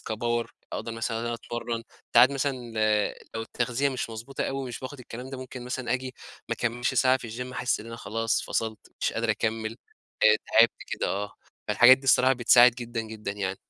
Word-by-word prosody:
كpower 120 +1 -2 0.3
أقدر 115 - -4
مثلًا 115 0 -2
إن - - -4
أنا 120 0 -2
أتمرن، 115 0 -4 0.3
ساعات 120 +3 +8
مثلًا، 140 0 0 0.8
لو 115 - -2
التغذية 120 +4 -1
مش 130 -3 -3
مضبوطة 115 +5 -5
أوي 135 -1 -3
مش 120 - -6
باخد 135 +1 -7
الكلام 125 +2 -8
ده 135 - -6
ممكن 130 -1 -8
مثلًا 125 -1 -3
آجي 130 0 -3 0.3
ما 115 - 0
اكملش 120 +2 -1
ساعة 130 +1 +4
في 130 - -12
الجيم 125 +3 -6
أحس 125 0 0
إن 110 - -10
أنا 115 0 -7
خلاص 115 0 -1
فصلت 110 -1 -2 0.2
مش - - 0
قادر 115 -1 0
أكمّل 110 +1 -2 0.5
آآ - - +7
تعبت - - +4
كده - - -2
آه، 100 +1 -3 0.4
فالحاجات 120 +5 +7
دي 135 - -17
بصراحة 130 0 +5
بتساعد 120 0 +6
جدًا 120 -1 -4
جدًا 110 -2 -5
يعني. 95 -2 -3
120 Hz, 195 wpm, -27 LUFS, 115-130 Hz, 0.8 s, ساعات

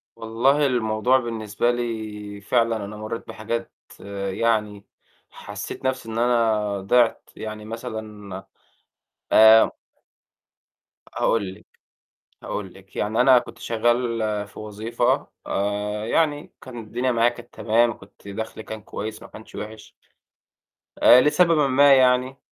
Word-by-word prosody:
والله 130 +6 +1
الموضوع 120 0 +2
بالنسبة 115 -1 -1
لي 110 -4 -5
فعلًا 115 -1 +1
أنا 105 +1 -8
مرّيت 110 +2 -6
بحاجات 115 +2 -4 0.6
يعني 105 -1 -1 0.4
حسّيت - - -8
نَفْسي 130 -3 -2
إن 110 - -5
أنا 110 -4 +1
ضِعْت، 115 +4 +2
يعني 110 -1 -7
مثلًا 110 -4 -7 0.9
آآ 110 +1 +7 1.4
هاقول 100 -5 0
لِك، 105 - -18 0.8
هاقول 95 -3 -5
لِك. 95 0 -18
يعني 110 +3 0
أنا 125 0 +7
كنت - - -9
شغّال 115 -2 0
في - - -15
وظيفة 110 +2 -1 0.2
آآ 105 +2 -2
يعني 150 +1 0
كان 125 -2 -10
الدنيا 120 +3 -2
معايا 115 0 +3
كانت 120 0 -9
تمام، 115 +1 +2
كنت 100 0 -16
دَخْلي 110 +2 -6
كان 110 0 -8
كويس 105 +3 -6
ما - - -11
كانش 110 - -14
وحش. 110 0 -8 1.1
آآ 125 - +9
لسببٍ 170 +4 +3 0.2
ما 140 +2 +6
يعني 130 0 +3
110 Hz, 120 wpm, -23 LUFS, 105-120 Hz, 1.4 s, آآ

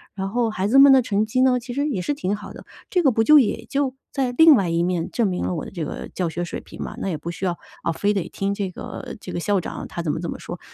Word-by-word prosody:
然 195 -1 -3
后 235 +1 0
孩 195 -2 -1
子 270 +4 +6
们 275 0 +9
的 265 - +6
成 210 -2 0
绩 235 +4 0
呢， 255 -1 +4
其 245 0 -7
实 285 +2 0
也 220 -11 -2
是 290 - -1
挺 205 -8 -2
好 205 - -9
的， - - -12 0.2
这 360 - +2
个 270 - +5
不 225 0 +2
就 300 +4 +8
也 245 - 0
就 275 -2 0 0.2
在 265 -3 -1
另 320 -2 +9
外 195 -7 +1
一 170 +1 +1
面， 175 -1 -1
证 230 -3 +1
明 180 -2 -2
了 - - -1
我 160 - -4
的 - - -9
这 170 -4 -4
个 - - -6
教 180 -3 -1
学 175 +2 -3
水 175 - -5
平 - - -11
吗？ - - -6
那 195 - -2
也 160 - -2
不 155 +3 -6
需 180 +2 -5
要， 175 -1 -1 0.3
啊， - - +1
非 205 +5 0
得 195 -4 -2
听 195 0 -2
这 200 -2 -3
个 - - -8
这 185 - -8
个 - - -3
校 200 +2 +1
长 - - -6
他 170 - -5
怎 160 -3 -1
么 - - -3
怎 170 0 -4
么 - - -6
说， 175 - -7
200 Hz, 335 characters per minute, -23 LUFS, 175-255 Hz, 0.3 s, 们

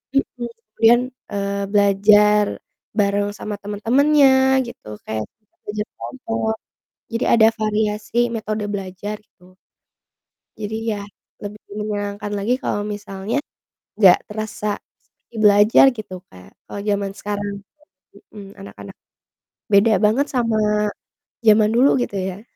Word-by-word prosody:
Mhm, 245 -3 -1 0.2
kemudian, 230 +2 +5 0.3
eee, 200 0 -2
belajar 205 +1 +5 0.5
bareng 205 -1 +1
sama 210 -1 -5
temen-temennya 265 +5 +3
gitu 235 - -12 0.2
kayak 110 -1 -4 0.4
belajar 210 +1 -4
kelompok 225 -3 -3 0.6
jadi 230 0 -1
ada 220 -1 +6
variasi 215 +2 -1
metode 215 -2 -3
belajar 200 +1 -5
gitu, 185 -3 -24 1.0
jadi 215 +1 -4 0.2
ya 205 - -4 0.4
lebih 205 0 -7 0.2
menyenangkan 205 -1 -4
lagi 240 +6 -1
kalau 205 -6 -2
misalnya 205 +3 -4 0.6
nggak 190 -4 +5
terasa 210 -1 -4 0.2
seperti - - -34
belajar 210 +3 +6
gitu 185 -4 -8
Kak, 90 +1 -16 0.2
kalau 200 - -6
zaman 200 -1 -1
sekarang. 205 0 -4 0.6
Mmm, - - -18
mhm, 200 -2 -10
anak-anak 195 - -11 0.8
beda 205 +2 +5
banget 225 +7 +3
sama 230 -3 +1 0.9
zaman 215 0 +5
dulu 250 +4 +4
gitu 205 -5 -3
ya. 190 +1 -4
210 Hz, 115 wpm, -20 LUFS, 200-225 Hz, 1.0 s, ada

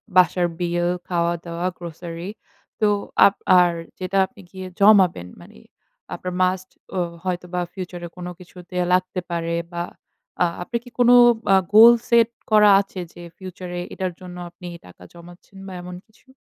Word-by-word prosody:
বাসার 180 -1 +4
বিল, 175 0 0 0.2
খাওয়া-দাওয়া, 170 0 -2
grocery, 170 +1 -7 0.5
তো 215 - +3 0.4
আপ 200 - +4 0.2
আর 175 -1 +4 0.3
যেটা 185 +1 -2
আপনি 205 0 -16
গিয়ে 190 -1 -8
জমাবেন, 195 - +5
মানে 85 - -16 0.6
আপনার 180 0 -5
মাস্ট 185 0 -1 0.3
ও - - +1 0.2
হয়তোবা 180 -1 -3
ফিউচারে 180 -2 -7
কোন 180 - -7
কিছুতে 180 0 -13 0.2
লাগতে 185 0 0
পারে। 170 0 -2 0.2
বা, 170 0 -3 0.6
আ - - +6 0.2
আপনার 235 +7 -3
কি 245 - -13
কোন 245 -1 +5 0.4
আ - - +7 0.2
গোল 230 +3 +9 0.2
সেট 235 -1 +5 0.2
করা 210 -1 +6
আছে, 195 -1 -9
যে 175 - -12 0.2
ফিউচারে 180 -1 -7
এটার 185 -1 -3
জন্য 180 -1 -9
আপনি 175 +1 -12 0.2
টাকা 90 0 -16
জমাচ্ছেন 175 +3 -15
বা, 190 - -8
এমন 180 0 -8
কিছু? 220 +4 -29
180 Hz, 150 wpm, -22 LUFS, 175-190 Hz, 0.6 s, গোল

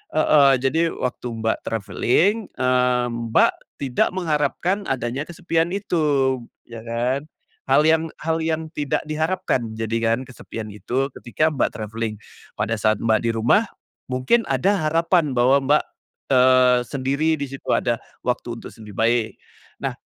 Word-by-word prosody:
heeh. 145 -3 +5
Jadi 140 +6 +1
waktu 125 0 -3 0.2
Mbak 110 - +1
travelling, 165 - +1
eee, 125 -1 +2
Mbak 115 -1 +2 0.3
tidak 130 -3 0
mengharapkan 175 +4 -1
adanya 130 +3 -2
kesepian 165 -1 -1
itu, 145 -9 +1 0.3
ya 115 -1 -9
kan. 125 +5 -2 0.4
Hal 150 - +4
yang 160 +1 +3 0.2
hal 160 0 0
yang 160 0 -2
tidak 145 -4 -2
diharapkan, 155 -7 -1
jadi 115 +1 -2
kan, 115 +1 +1
kesepian 115 -4 -8
itu, 130 +6 -2
ketika 155 +6 0
Mbak 145 - -1
travelling. 110 0 -4 0.4
Pada 110 +1 -1
saat 110 +1 +3
Mbak 110 -1 +3
di - - +2
rumah, 120 - +3 0.4
mungkin 130 - +1
ada 155 +5 +1
harapan 165 -3 +2
bahwa 130 +3 +4
Mbak, 150 +1 +4 0.5
eee, 130 -1 +5
sendiri 140 +4 0
di 145 - -4
situ 135 - -10
ada 120 -1 0 0.2
waktu 120 -1 -2
untuk - - -10
sendiri 105 -3 -12
baik. 115 0 +1 0.5
Nah, - - -1
130 Hz, 140 wpm, -22 LUFS, 120-155 Hz, 0.5 s, heeh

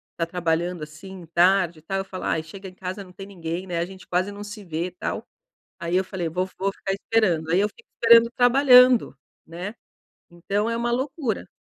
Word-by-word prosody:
tá 165 - -1
trabalhando 175 -1 -1
assim 175 +4 -10
tarde 175 -2 +3
e - - -20
tal, 195 +4 -3
eu 195 - -3
falo: 185 -1 -7
"Ai 160 - 0
chega 190 +4 -10
em 185 - -18
casa 190 +2 -6
não 180 - -15
tem 195 - -9
ninguém 175 -2 -5
né. 175 -2 -3
A 170 - 0
gente 190 0 -12
quase 185 +3 0
não 205 +1 -8
se 210 0 -9
vê", 170 +1 -3
tal. 180 - -5 0.5
Aí 170 +1 -2
eu 190 - +3
falei: 185 -3 -4
"Vo 180 +3 -1
vou 195 +1 0
ficar 195 0 -4
esperando". 195 -6 +1
Aí 175 +3 +3
eu 205 - +3
fico 470 - -22
esperando 230 0 +6
trabalhando, 250 - +6 0.3
né. 180 +6 -6 0.6
Então 200 +5 -2
é 230 - -1
uma 240 +1 -1
loucura. 260 - -2
190 Hz, 205 wpm, -24 LUFS, 175-210 Hz, 0.6 s, esperando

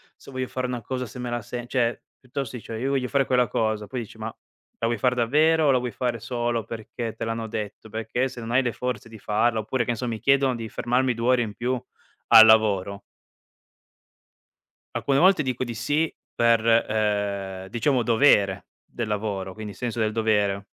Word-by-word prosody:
se - - -16
voglio 130 -1 -3
fare 130 0 -3
una 125 -2 -4
cosa 125 +1 -4
se 120 - -11
me 125 -1 -4
la 120 -1 -2
se 120 +3 -6
cioè 120 -1 0 0.2
piuttosto 130 -1 -5
dici: 115 - -9
"Io 125 +5 -2
voglio 130 -2 0
fare 135 +1 +1
quella 125 -2 +2
cosa", 110 -2 -1
poi 125 +3 -4
dici: 110 0 -11
"Ma 110 - -4
la 115 - -9
vuoi 115 -1 0
far 125 -1 +2
davvero 155 +7 +3
o 140 - +5
la 130 - +3
vuoi 125 0 -3
fare 120 -1 -2
solo 120 -1 -2
perché 115 +1 -6
te - - -4
l'hanno 115 0 -3
detto? 110 0 -6
Perché 115 +4 -1
se 125 -2 -9
non 115 - -5
hai 125 +2 +4
le 120 -4 -2
forze 125 -1 -4
di 110 - -11
farla" 110 +3 +1
oppure, 120 +2 -1
che - - -7
ne 115 - -3
so, 125 - -3
mi 115 -2 -3
chiedono 135 +2 +3
di 115 -2 -6
fermarmi 125 +1 0
2 115 +1 -2
ore 125 -1 +4
in 105 -3 -4
più 125 0 -2 0.4
al 110 0 +10
lavoro 100 -3 +3 1.9
alcune 140 0 +1
volte 185 -2 +5
dico 130 -2 -2
di 120 -1 -4
sì 150 +7 0 0.2
per, 115 -1 +3
ehm, 100 -4 0
diciamo 120 +4 +1
dovere 110 -6 +3 0.2
del 120 - -5
lavoro, 100 -3 -3
quindi 110 -2 -7
senso 120 +4 -4
del 110 0 +1
dovere. 105 -3 +1
115 Hz, 200 wpm, -25 LUFS, 110-125 Hz, 1.9 s, al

